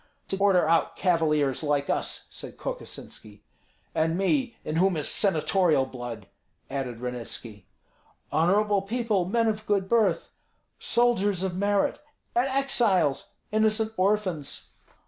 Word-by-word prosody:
"To 195 - -1
order 195 -4 +4
out 165 +1 +2
cavaliers 150 -7 +1
like 145 -2 0
us!" - - -2
said - - -9
Kokosinski. 105 -1 -8 0.5
"And 160 +2 +1
me, 245 +6 0
in 155 - -2
whom 185 0 +3
is 150 - -2
senatorial 170 -5 +2
blood!" 120 -5 -7 0.5
added 125 -4 -4
Ranitski. 120 -5 -5 0.6
"Honorable 200 +5 +3
people, 215 -2 0
men 230 +5 +1
of 215 -1 -2
good 200 -2 +1
birth!" 230 +1 +2 0.5
"Soldiers 205 -6 +2
of 185 -2 -2
merit!" 200 +1 +1 0.3
"And 245 +3 +2
exiles!" 235 - +1 0.2
"Innocent 220 +1 +1
orphans!" 185 -6 -1
190 Hz, 120 wpm, -27 LUFS, 150-215 Hz, 0.6 s, order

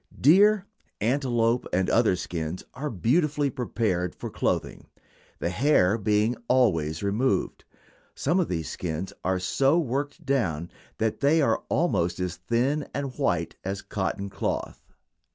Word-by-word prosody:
Deer, 200 +7 +5 0.3
antelope, 120 -1 +1
and 95 +1 +1
other 115 -5 +3
skins 85 -1 -4
are 150 +4 -4
beautifully 145 - +1
prepared 105 -9 -1
for - - -7
clothing, - - -2 0.5
the 85 - -2
hair 110 -5 +3
being 105 +2 +1
always 85 -11 +2
removed. 110 +7 0 0.5
Some 170 +7 +1
of 180 - +1
these 80 -4 -3
skins 85 +2 -4
are 95 0 +1
so 135 - +2
worked 145 +2 -2
down 85 - 0 0.3
that 110 -1 -1
they 145 +3 +4
are 125 -7 +2
almost 90 - +1
as 90 -1 -3
thin 130 +6 0
and 140 -2 -3
white - - 0
as 95 +1 -4
cotton 100 0 -3
cloth. - - -4
115 Hz, 135 wpm, -26 LUFS, 90-140 Hz, 0.5 s, Deer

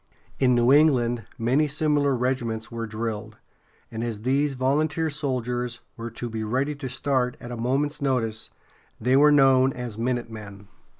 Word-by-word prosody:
In 125 -2 +4
New 120 +2 +4
England 120 -7 +3
many 130 +7 +2
similar 145 -1 +1
regiments 120 -3 -2
were 115 -1 -4
drilled, 110 0 -5 0.5
and 115 0 -4
as 110 -3 -4
these 135 +2 +1
volunteer 155 +5 0
soldiers 125 -4 -2
were 115 0 -6
to 120 +1 -6
be 110 -1 -4
ready 130 +7 -1
to 140 -2 -6
start 125 -1 0
at 120 - -9
a - - -4
moment's 135 +6 -1
notice, 115 -5 -1 0.5
they 125 +4 +2
were 150 +2 +6
known 135 -2 +5
as 120 -3 -6
"minutemen." 110 -5 -4
125 Hz, 155 wpm, -25 LUFS, 115-140 Hz, 0.5 s, were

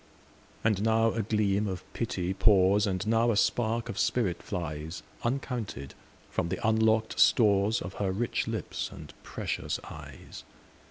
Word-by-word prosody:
And 110 -3 +2
now 115 +1 +3
a 115 - -1
gleam 105 -1 +1
of 95 -1 -4
pity 95 -5 -2
pours, 100 +1 +4
And 95 0 -1
now 115 +2 +3
a 110 - +2
spark 115 +1 +1
of - - -5
spirit 100 -9 0
flies, 80 -3 -5 0.2
Uncounted, 120 - -3 0.4
from 85 - -1
the 95 - -2
unlock'd 110 0 +2
storesOf 100 -2 +3
her 100 -2 0
rich 115 +5 -1
lips - - -3
and - - -11
precious - - -3
eyes. - - -10
105 Hz, 140 wpm, -29 LUFS, 95-115 Hz, 0.4 s, pours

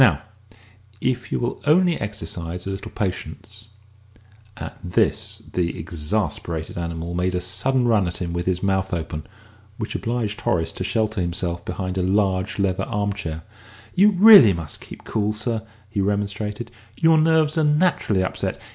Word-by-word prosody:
Now, 95 - +5 0.8
if 125 +1 -1
you - - 0
will 120 +1 -3
only 175 +2 +5
exercise 90 -4 -5
a 95 - -3
little 95 +1 -6
patience 105 +2 -5 0.4
" 105 0 -28
At - - -12
this 90 -2 0
the 85 -1 -1
exasperated 80 0 -3
animal 85 0 -4
made 90 +1 0
a - - +1
sudden 120 +8 0
run 105 -5 +3
at 85 - -3
him 85 -2 -4
with 85 +1 -3
his 95 0 0
mouth 95 -1 +1
open, 80 -2 -5 0.5
which 110 - -4
obliged 115 -3 -2
Horace 80 -2 +1
to 95 - -4
shelter 110 0 0
himself 85 0 -2
behind 95 0 -3
a - - +1
large 95 0 +1
leather 95 -2 0
arm 100 -1 -1
chair. 80 -5 -5 0.5
"You 200 +3 +6
really 195 - +9
must 85 -3 -6
keep - - -11
cool, 105 -1 -1
sir," 110 +1 -2 0.3
he 100 -1 -2
remonstrated; 105 +3 -2 0.3
"your 160 -1 +5
nerves 155 -1 +3
are 160 - +2
naturally 150 - +2
upset. 95 - -3
100 Hz, 160 wpm, -23 LUFS, 90-110 Hz, 0.8 s, really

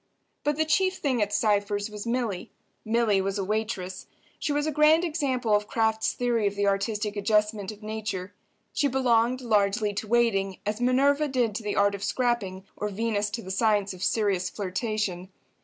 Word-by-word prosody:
But 295 0 +1
the 315 +2 +1
chief 370 +4 +2
thing 260 -6 0
at 205 0 0
Cypher's 205 -1 +1
was 210 +2 -7
Milly. 235 -6 -2 0.3
Milly 220 -3 +2
was 195 +1 -2
a 195 - -1
waitress. 205 -2 -3 0.3
She - - -1
was 290 +1 0
a 310 - 0
grand 305 +3 +5
example 270 -9 0
of 210 0 0
Kraft's 220 -1 +1
theory 235 -4 +1
of 200 - -2
the 205 0 0
artistic 205 +1 0
adjustment 210 -1 +1
of 215 0 -13
nature. 210 -3 -4 0.4
She 285 - +2
belonged, 250 -1 +2
largely, 210 -2 +1
to 205 +2 -4
waiting, 205 -5 +2
as 210 +3 -2
Minerva 280 +4 +3
did 250 -5 0
to 220 - -4
the 210 -1 -3
art 200 0 +3
of 200 0 -5
scrapping, 205 -5 -1
or 210 - -3
Venus 210 0 -1
to 225 +2 -5
the 190 - -6
science 205 -1 +1
of 180 - -11
serious 195 -5 +1
flirtation. 195 -2 -3
215 Hz, 180 wpm, -27 LUFS, 200-240 Hz, 0.4 s, grand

